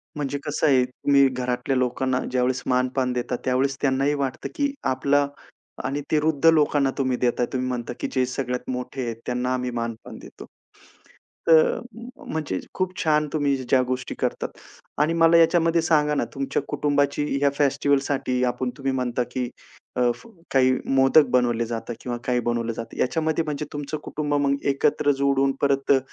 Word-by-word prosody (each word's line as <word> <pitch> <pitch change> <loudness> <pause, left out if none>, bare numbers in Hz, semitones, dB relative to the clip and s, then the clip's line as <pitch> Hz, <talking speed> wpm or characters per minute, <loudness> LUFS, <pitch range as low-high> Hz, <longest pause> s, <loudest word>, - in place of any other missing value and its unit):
म्हणजे 145 -1 -2
कसं 150 +1 0
आहे 130 -3 +5
तुम्ही 140 +2 +3
घरातल्या 125 +1 -2
लोकांना 125 +1 0
ज्यावेळेस 125 0 0
मान-पान 125 0 +1
देता, 125 0 -2
त्यावेळेस 130 +2 +1
त्यांनाही 135 +1 +2
वाटतं, 130 - -4
की 285 -3 0 0.2
आपला 145 +2 +2 0.6
आणि 140 +2 -2
वृद्ध 155 -1 +1
लोकांना 145 -3 +2
तुम्ही 130 -2 0
देता. 120 0 +1
तुम्ही 130 0 -1
म्हणता, 120 -1 -3
की - - -2
जे 130 -1 +1
सगळ्यात 125 0 -4
मोठे 125 +1 -4
आहेत, 115 -1 -3
त्यांना 125 +1 -1
आम्ही 125 -1 -2
मान-पान 115 -1 -6
देतो. - - -12 1.0
तर 165 -1 +8 0.2
अ, - - -6 0.5
म्हणजे 150 -13 -2
खूप 185 -1 -1
छान 150 -2 +2
तुम्ही 145 -3 +1
ज्या 130 0 +2
गोष्टी 125 0 -3
करतात - - -2 0.5
आणि 155 +2 +2
मला 165 0 +5
याच्यामध्ये 165 0 +4
सांगा 150 -2 +2
ना, - - 0
तुमच्या 135 +1 -1
कुटुंबाची 145 0 0 0.2
ह्या 140 0 +3
फेस्टिव्हलसाठी 140 -2 +1
आपण 125 +1 -1
तुम्ही 135 -1 -1
म्हणता, 125 -1 -1
की 125 -1 -2 0.5
अ, 125 - 0 0.5
काही 130 -1 +5 0.2
मोदक 135 +3 +6
बनवले 120 -2 +2
जातं 115 +1 -5
किंवा 120 -1 -4
काही 125 -1 +1
बनवलं 120 -1 -1
जातं 115 +1 -8
याच्यामध्ये 160 +4 0
म्हणजे 150 -1 -3
तुमचं 145 +1 -4
कुटुंब 145 -1 -3
मग 140 - +2 0.2
एकत्र 145 +1 +2
जोडून 135 0 +3
परत 140 -1 +2
अ, 140 - +7
135 Hz, 160 wpm, -24 LUFS, 125-145 Hz, 1.0 s, तर